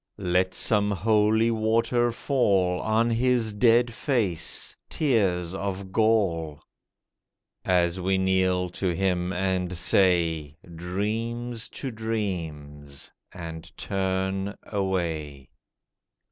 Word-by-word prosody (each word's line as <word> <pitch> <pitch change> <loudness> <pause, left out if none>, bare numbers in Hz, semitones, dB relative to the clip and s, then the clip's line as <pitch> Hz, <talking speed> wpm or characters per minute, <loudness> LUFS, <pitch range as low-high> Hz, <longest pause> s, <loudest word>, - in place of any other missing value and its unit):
Let 95 -1 0
some 105 -2 +2
holy 110 +3 +2
water 115 +2 +1
fall 100 -9 +1
On 115 +2 +1
his 120 -2 +1
dead 120 +2 +3
face, 105 - 0
tears 95 - +1
of 95 0 -4
gall— 95 -9 +1 1.0
As 90 0 +1
we 95 +1 +1
kneel 95 -1 +1
to 90 -1 -2
him 90 -1 0
and 90 -1 -1
say, 85 -5 +2 0.2
"Dreams 110 +6 -3
to 135 - -5
dreams," 80 - -5 0.2
and 85 -1 -8
turn 95 +1 -2
away. 85 -9 -3
95 Hz, 90 wpm, -26 LUFS, 90-110 Hz, 1.0 s, dead